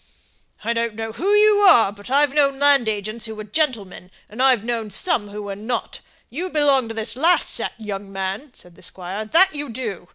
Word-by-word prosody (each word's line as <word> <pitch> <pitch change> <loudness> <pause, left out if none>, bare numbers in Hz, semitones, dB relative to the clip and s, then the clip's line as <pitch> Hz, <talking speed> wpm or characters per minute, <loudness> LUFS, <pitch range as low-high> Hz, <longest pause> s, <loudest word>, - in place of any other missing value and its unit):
"I 230 +2 0
don't 230 -1 -2
know 225 0 -5
who 350 - -3
you 420 0 +5
are, 245 - +6
but 205 +2 -12
I've 280 +1 +3
known 280 -2 +2
land 280 -4 +4
agents 215 +2 -3
who 220 - -7
were 215 - -7
gentlemen, 210 - -3 0.2
and 220 +4 -5
I've 260 -5 +4
known 230 -2 -3
some 210 - 0
who 205 +1 -7
were 200 -1 -5
not. 225 +3 -4 0.3
You 345 +9 -4
belong 285 -6 +2
to 225 - -7
this 225 0 -4
last 330 +7 +2
set, - - -4
young 200 -2 -6
man," 195 +8 -4
said 175 -1 -9
the - - -18
squire, 190 +4 -6
"that 355 - +4
you 290 -2 -5
do. 220 -7 -6
230 Hz, 205 wpm, -21 LUFS, 210-285 Hz, 0.3 s, are